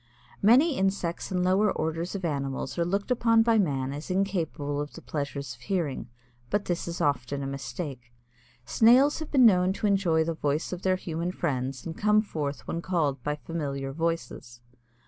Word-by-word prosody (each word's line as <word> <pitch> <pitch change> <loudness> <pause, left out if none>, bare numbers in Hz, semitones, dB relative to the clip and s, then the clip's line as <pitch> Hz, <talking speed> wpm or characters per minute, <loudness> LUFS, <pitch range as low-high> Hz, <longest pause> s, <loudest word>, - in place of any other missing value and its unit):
Many 260 +8 +5
insects 190 -3 -1
and 180 -1 0
lower 190 +3 +3
orders 165 +4 -2
of 190 -3 -3
animals 135 -3 -3
are - - +3
looked 200 +7 -1
upon 230 -2 +4
by 225 -1 +3
man 135 -7 0
as 150 +5 -7
incapable 170 -7 -1
of 145 - -6
the - - -10
pleasures 140 -1 -4
of - - -17
hearing. 160 - -2 0.4
But 205 - 0
this 175 -1 -2
is 170 0 -4
often 140 0 0
a - - -3
mistake. 135 -2 -6 0.5
Snails 250 - +5
have 315 - -6
been 260 -4 +5
known 185 -3 +5
to 210 - -4
enjoy 190 -6 +3
the 165 +1 -2
voice 150 +2 -1
of 180 - -5
their 185 -1 +2
human 170 -1 -3
friends 130 -5 -3
and 160 - -5
come 210 +2 +3
forth 145 -8 -4
when 170 - -3
called 160 -7 0
by 150 0 -2
familiar 140 -4 -4
voices. 160 -7 -3
170 Hz, 180 wpm, -27 LUFS, 145-195 Hz, 0.5 s, Many